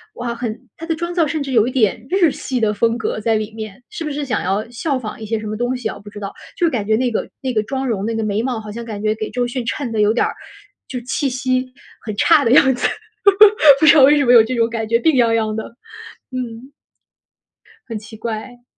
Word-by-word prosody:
哇， 240 -1 -4
很 235 -1 -5 0.2
她 330 - -8
的 325 - -1
妆 340 +2 -4
造 340 -2 +2
甚 310 +1 -2
至 275 - -5
有 230 -3 +3
一 255 - -2
点 220 -2 +1
日 360 -5 +3
系 255 -2 -3
的 215 -2 +1
风 230 +3 +1
格 225 - -3
在 220 +1 +1
里 215 0 -3
面。 220 +1 -8
是 425 -6 -6
不 305 - -3
是 290 0 -3
想 255 - -1
要 195 +4 -1
效 270 +3 -2
仿 220 -2 -7
一 - - -5
些 220 +1 -2
什 215 - -8
么 215 - -3
东 245 +3 -1
西 250 - -3
啊， - - -6
我 - - -12
不 205 - -11
知 205 - -10
道。 195 -1 -6 0.2
就 345 - +2
感 225 -8 -2
觉 220 - +2
那 245 +1 0
个 - - -2
那 260 -2 -2
个 215 - +2
妆 265 +3 -3
容、 205 -5 -1
那 225 +1 -2
个 225 - -1
眉 210 0 -1
毛， 245 -2 -2
好 210 -1 -8
像 235 +2 -6
感 210 -3 -6
觉 215 0 +2
给 215 -1 -4
周 245 -1 -1
迅 245 0 -4
衬 245 +1 -3
的 220 -1 0
有 210 +1 +4
点 240 - +2
儿 - - -3 0.5
就 250 - -5
气 260 +4 -1
息 255 0 -1 0.3
很 215 -2 -6
差 - - +5
的 230 - +2
样 265 0 +6
子， 245 - +1 0.9
不 315 - +3
知 300 - +8
道 290 - +7
为 290 +3 +6
什 285 - +2
么 245 - +4
有 230 -2 +8
这 250 +3 -3
种 230 -1 +2
感 225 -1 -3
觉， 230 +1 +3
病 320 +6 +3
怏 230 -3 +3
怏 220 -1 0
的。 220 +1 -6 0.6
嗯。 250 +1 -6 1.2
很 225 -2 -4
奇 220 +1 -12
怪。 235 +2 -6
235 Hz, 285 characters per minute, -19 LUFS, 220-260 Hz, 1.2 s, 知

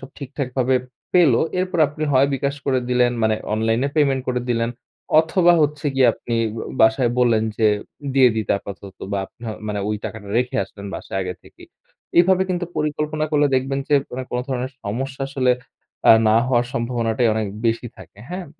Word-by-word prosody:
সব 135 - -10
ঠিকঠাক 140 -1 -4
ভাবে 130 0 +2 0.4
পেলো, 165 -10 +5 0.2
এরপর 185 -1 -1
আপনি 150 +1 -7
হয় 130 +1 +5
bKash 140 +1 -2
করে 130 -2 +2
দিলেন। 125 -1 +3
মানে 110 0 +3 0.2
অনলাইনে 115 +4 +1
পেমেন্ট 135 -3 +2
করে 125 -1 0
দিলেন 115 0 0 0.5
অথবা 175 +2 +3
হচ্ছে 150 0 -1
গিয়ে 130 -1 +5
আপনি 120 - -5 0.2
বো 110 - -4 0.2
বাসায় 115 +2 +4
বললেন 120 -3 +3 0.2
যে, 110 - +4 0.5
দিয়ে 130 -2 +6
দিতে 110 -3 0
আপাতত 100 -1 -10
বা 100 - 0 0.5
মানে 105 -1 -2
ওই 105 - -1
টাকাটা 105 -2 -7
রেখে 125 0 -1
আসলেন 100 +1 -11
বাসায় 95 - -5
আগে 90 0 -4
থেকেই। - - -16 0.5
এভাবে 185 +2 +5
কিন্তু 175 -1 -1
পরিকল্পনা 150 0 -1
করলে 145 -1 +4
দেখবেন 135 +1 0
যে, 150 - +3 0.2
ওরা 130 - -3
কোনো 125 - -1
ধরনের 130 -1 -2
সমস্যা 130 +6 -4
আসলে 130 -2 +1 0.6
আ - - +11 0.2
না 110 - +4
হওয়ার 120 -2 +2
সম্ভাবনাটাই 115 0 0
অনেক 110 -1 -1 0.2
বেশি 115 +2 0
থাকে। - - -15
হ্যাঁ? 180 +1 -5
130 Hz, 175 wpm, -21 LUFS, 115-145 Hz, 0.6 s, আ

